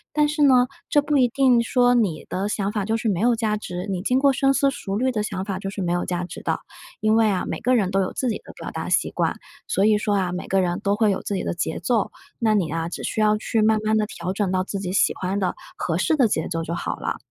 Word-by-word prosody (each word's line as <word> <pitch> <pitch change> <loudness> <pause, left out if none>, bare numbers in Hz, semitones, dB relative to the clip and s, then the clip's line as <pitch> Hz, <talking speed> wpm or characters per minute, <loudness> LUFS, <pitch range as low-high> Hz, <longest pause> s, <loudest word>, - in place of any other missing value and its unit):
但 300 -1 +3
是 300 -1 +1
呢， 255 -2 +5 0.2
这 295 - +4
不 290 0 +1
一 255 - +5
定 250 -1 +3
说 245 +1 +3
你 205 -10 +1
的 195 +2 -2
想 205 -1 -1
法 210 -2 -2
就 220 - 0
是 225 -1 -1
没 185 - 0
有 235 +3 +3
价 220 -2 0
值 180 -1 -6
你 185 -1 -2
经 250 +3 +2
过 275 0 +4
深 270 0 +2
思 275 0 +3
熟 200 -7 -4
虑 255 +4 +1
的 210 -3 -1
想 190 -2 -3
法 195 -2 -3
就 195 0 -5
是 195 - -5
没 175 -1 -1
有 175 - 0
价 180 0 -2
值 175 - -8
的。 - - -1 0.4
因 215 0 +3
为 225 -1 +4
啊， 195 -3 0
每 - - -3
个 255 +1 +3
人 200 -6 +2
都 195 +1 +1
有 - - -4
自 255 - -1
己 215 - -1
的 - - -12
表 - - -7
达 - - -5
习 - - +2
惯， - - -1 0.3
所 195 - +2
以 215 -1 +4
说 210 0 0
啊， 185 -3 0
每 180 - -5
个 195 0 +2
人 175 -1 -1
都 200 0 +1
会 215 -1 +3
有 195 - -1
自 - - -3
己 195 - -2
的 - - -2
节 - - -2
奏， 215 +4 0 0.3
那 220 -2 +2
你 180 -7 +1
啊， 165 0 -2
只 - - -6
需 220 - -1
要 215 0 +4
去 220 +1 0
慢 215 0 +3
慢 215 0 +2
地 215 - +2
调 205 -5 -5
整 195 -2 -1
到 185 0 +1
自 195 - -5
己 190 -1 -4
喜 - - +3
欢 190 +2 -2
的、 185 -3 -1 0.2
合 165 -1 -2
适 310 - +2
的 265 -6 +4
节 - - -1
奏 165 0 -2
就 165 +1 -3
好 - - -3
了。 - - -3
210 Hz, 315 characters per minute, -23 LUFS, 185-240 Hz, 0.4 s, 呢